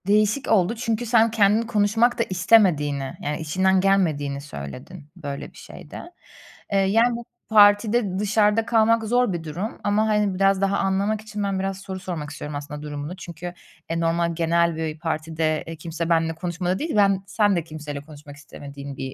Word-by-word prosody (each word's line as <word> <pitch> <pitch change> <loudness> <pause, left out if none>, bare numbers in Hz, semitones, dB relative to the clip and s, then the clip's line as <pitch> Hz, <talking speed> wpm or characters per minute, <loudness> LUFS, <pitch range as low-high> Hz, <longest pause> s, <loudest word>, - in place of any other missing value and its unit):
Değişik 215 +5 +2
oldu 205 +1 +3
çünkü 230 0 -2
sen 225 -1 +4
kendin 210 0 +3
konuşmak 225 +2 +1
da - - +4
istemediğini 170 -8 +3
yani 150 0 -3
içinden 185 +4 +2
gelmediğini 155 -8 +1
söyledin 140 - -9
böyle 145 -5 -6
bir - - -19
şeyde. - - -10 0.7
Eee, 200 - +2
yani, 225 +5 +3
bu 235 0 -7 0.2
partide 205 -1 +4
dışarıda 210 +1 +2
kalmak 225 0 +3
zor 245 -1 +1
bir 170 -2 -4
durum 175 +8 -5
ama, 210 +2 +2
hani, 210 -3 +1
biraz 195 0 +2
daha 195 0 +1
anlamak 200 +2 0
için 215 -1 -5
ben 195 -1 -1
biraz 195 0 -2
soru 190 -1 -6
sormak 170 -6 -5
istiyorum 150 0 -7
aslında 145 +1 -6
durumunu. 145 +3 -6
Çünkü, 175 0 -8 0.4
e, 165 0 -1
normal, 170 0 0
genel 170 0 +2
bir 160 -1 -4
partide, 160 -1 -2
eee, 165 - -6
kimse 165 +1 -5
benimle 165 -1 +1
konuşmadı 180 +2 -2
değil, 320 -3 -3
ben 195 -2 +3
sen 205 -1 +2
de 170 - -1
kimseyle 150 -3 -7
konuşmak 145 -1 -13
istemediğin 140 -1 -10
bir 130 -1 -5
185 Hz, 175 wpm, -23 LUFS, 155-210 Hz, 0.7 s, sen